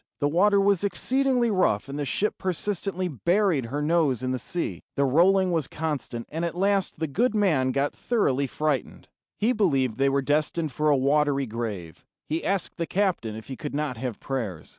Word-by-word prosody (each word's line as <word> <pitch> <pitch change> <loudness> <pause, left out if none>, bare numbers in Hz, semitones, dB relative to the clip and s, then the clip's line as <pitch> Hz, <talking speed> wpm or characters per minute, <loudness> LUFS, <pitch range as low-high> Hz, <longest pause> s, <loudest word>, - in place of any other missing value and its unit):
The 145 - +2
water 200 +6 +4
was 200 -1 +2
exceedingly 250 +4 +1
rough, 180 - +1
and 140 +1 -5
the 145 - -1
ship 210 +9 -1
persistently 185 0 -2
buried 170 - +1
her 145 +5 -3
nose 150 -6 +2
in 130 - -1
the 130 - -1
sea. 175 +6 -3
The 140 - +2
rolling 180 +7 +4
was 160 -5 0
constant, 145 -7 -4
and 160 +3 -3
at 170 0 -3
last 195 -3 +1
the 160 - 0
good 220 - 0
man 155 -11 +2
got 140 +2 0
thoroughly 140 - 0
frightened. 145 -3 -2 0.3
He 230 +4 +2
believed 135 - +1
they 135 0 +4
were 140 0 +1
destined 150 +2 0
for 150 +4 0
a 145 - +4
watery 140 0 +2
grave. 105 - -5 0.2
He 160 +2 -2
asked 195 -2 -2
the 170 -1 -2
captain 180 - 0
if 110 -1 -9
he 130 - -6
could 145 +2 -6
not 145 -4 -2
have 125 -2 -4
prayers. 115 - -4
150 Hz, 190 wpm, -26 LUFS, 135-190 Hz, 0.3 s, water